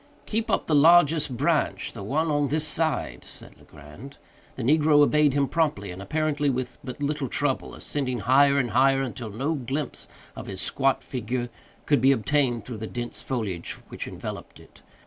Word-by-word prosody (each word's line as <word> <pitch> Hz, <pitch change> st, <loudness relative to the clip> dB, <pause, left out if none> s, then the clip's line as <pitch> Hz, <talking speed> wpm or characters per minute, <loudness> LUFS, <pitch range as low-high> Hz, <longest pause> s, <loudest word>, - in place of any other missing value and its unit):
"Keep 225 Hz, +1 st, -2 dB
up -, -, +1 dB
the 160 Hz, -, -1 dB
largest 150 Hz, -3 st, +5 dB
branch—the 145 Hz, -6 st, -1 dB
one 150 Hz, +10 st, -1 dB
on 145 Hz, -1 st, +1 dB
this 155 Hz, +3 st, +3 dB
side," 160 Hz, 0 st, 0 dB
said -, -, -10 dB
Legrand. 95 Hz, -, -13 dB, 0.4 s
The 130 Hz, -, -5 dB
negro 150 Hz, +3 st, +4 dB
obeyed 150 Hz, -1 st, +3 dB
him 140 Hz, -1 st, +2 dB
promptly, 145 Hz, -, -1 dB
and 90 Hz, +2 st, -8 dB
apparently 150 Hz, +4 st, 0 dB
with 125 Hz, -1 st, -3 dB
but 135 Hz, +2 st, -6 dB
little 145 Hz, -1 st, -1 dB
trouble; 140 Hz, +2 st, -2 dB
ascending 130 Hz, -5 st, -3 dB
higher 140 Hz, +6 st, +4 dB
and 120 Hz, -5 st, 0 dB
higher, 135 Hz, +3 st, +3 dB
until 120 Hz, -3 st, -6 dB
no 135 Hz, +10 st, -2 dB
glimpse 140 Hz, 0 st, -4 dB, 0.3 s
of -, -, -8 dB
his 95 Hz, -2 st, -6 dB
squat 135 Hz, +5 st, 0 dB
figure 120 Hz, 0 st, -4 dB, 0.4 s
could 145 Hz, -5 st, +2 dB
be 135 Hz, +2 st, +5 dB
obtained 125 Hz, -3 st, +1 dB
through 120 Hz, -3 st, -6 dB
the 110 Hz, +1 st, -6 dB
dense 120 Hz, +1 st, -5 dB
foliage 105 Hz, -10 st, -4 dB, 0.2 s
which -, -, -6 dB
enveloped -, -, -8 dB
it. -, -, -19 dB
135 Hz, 170 wpm, -25 LUFS, 120-150 Hz, 0.4 s, largest